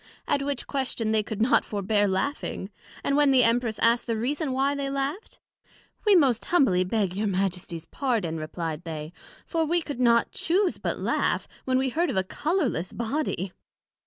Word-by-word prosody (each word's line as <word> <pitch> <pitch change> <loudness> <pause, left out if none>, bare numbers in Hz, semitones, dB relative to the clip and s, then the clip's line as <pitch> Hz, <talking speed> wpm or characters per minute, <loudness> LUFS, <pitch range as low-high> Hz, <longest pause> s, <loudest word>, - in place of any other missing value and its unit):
At 280 - +1
which 280 -1 -2
question 255 -5 -2
they 220 -1 +3
could 220 0 -2
not 255 - +4
forbear 205 0 +1
laughing; 195 0 -2 0.3
and 280 - +1
when 290 -1 +5
the 260 -2 +5
Empress 230 -2 +2
asked 235 +2 +2
the 230 -1 0
reason 275 +5 -1
why 270 +2 +1
they 280 -1 -2
laught? 275 +9 -3 0.7
We 410 - +7
most 265 -9 +3
humbly 260 - +3
beg 190 -1 -1
your 210 +2 0
Majesties 180 -4 -2
pardon, 220 - -1
replied 160 +1 -4
they; 155 -1 -6 0.3
for 330 -2 0
we 340 +3 +2
could 290 -6 -6
not 235 -2 +3
chuse 365 +2 +1
but - - -2
laugh, - - 0 0.2
when 255 0 +2
we 265 0 +1
heard 335 +7 0
of 240 - -2
a 190 - +3
colourless 285 - -1
Body. 230 - -2
235 Hz, 175 wpm, -26 LUFS, 195-280 Hz, 0.7 s, We